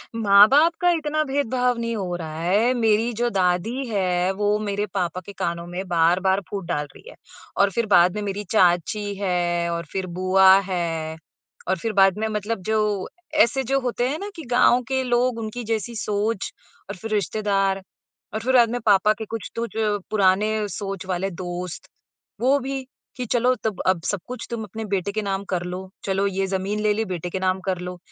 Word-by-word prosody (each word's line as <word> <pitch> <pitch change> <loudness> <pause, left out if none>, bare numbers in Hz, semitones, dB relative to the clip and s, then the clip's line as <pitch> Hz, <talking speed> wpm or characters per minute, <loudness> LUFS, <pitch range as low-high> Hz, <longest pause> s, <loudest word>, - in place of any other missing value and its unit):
माँ-बाप 225 +10 +6
का 355 - +4
इतना 310 -2 0
भेदभाव 255 -3 0
नहीं 230 0 -2
हो 185 -4 -3
रहा 160 -2 -6
है, 205 +8 +3
मेरी 225 -1 +2
जो 240 +1 +1
दादी 190 +8 0
है 185 -4 +1
वो 205 +2 +1
मेरे 205 -1 -2
पापा 185 -2 -2
के 200 - -9
कानों 170 -2 -3
में 180 +2 -5
बार-बार 180 +3 +2
फूट 195 -3 -4
डाल 150 -4 -1
रही - - -13
है। - - -13 0.4
और 200 - +4
फ़िर 230 +4 0
बाद 175 +2 +5
में 210 - -2
मेरी 205 0 -3
चाची 200 +2 +2
है, 175 -3 0
और 170 0 -3
फ़िर 190 -1 -2
बुआ 190 0 +6 0.2
है, 165 -3 -2 0.5
और 190 +1 +1
फ़िर 220 +6 -3
बाद 195 -1 +4
में 220 - 0
मतलब 215 0 -3
जो 210 -3 0 0.2
ऐसे 270 -3 +3
जो 270 +2 +1
होते 245 -1 -1
हैं 305 +4 -3
ना 405 - -5
कि 325 - -8
गाँव 245 0 +5
के 265 0 0
लोग, 245 -1 +1
उनकी 225 +2 -5
जैसी 225 +1 -3
सोच 210 -1 -1 0.4
और 200 - -4
फ़िर 220 +4 -7
रिश्तेदार 195 -1 0 0.5
और 220 - -1
फ़िर 250 +4 -1
बाद 240 -2 +6
में 245 - -1
पापा 210 0 +5
के 220 0 -7
कुछ 225 0 -6
तो 235 0 -2
जो 215 -2 0
पुराने 210 +1 +3
सोच 195 -2 -5
वाले 185 +1 -1
दोस्त 175 -1 -6 0.5
वो 265 +3 +4
भी, 270 0 -4 0.3
"कि 250 - -3
चलो 245 +2 +2
तब 215 -4 -2
अब 185 -3 +2
सब 205 - -1
कुछ 250 0 -6
तुम 230 -2 -3
अपने 220 +2 -6
बेटे 195 +1 0
के 215 +1 -2
नाम 195 -1 -2
कर 180 -2 -1
लो, 180 +1 -6 0.2
चलो 195 0 0
ये 195 0 -1
ज़मीन 195 +2 -2
ले 210 0 +2
ली, 220 +2 -1
बेटे 180 -2 -4
के 190 - -3
नाम 185 0 0
कर 185 -2 -1
लो, 180 0 -6
205 Hz, 200 wpm, -23 LUFS, 185-230 Hz, 0.5 s, माँ-बाप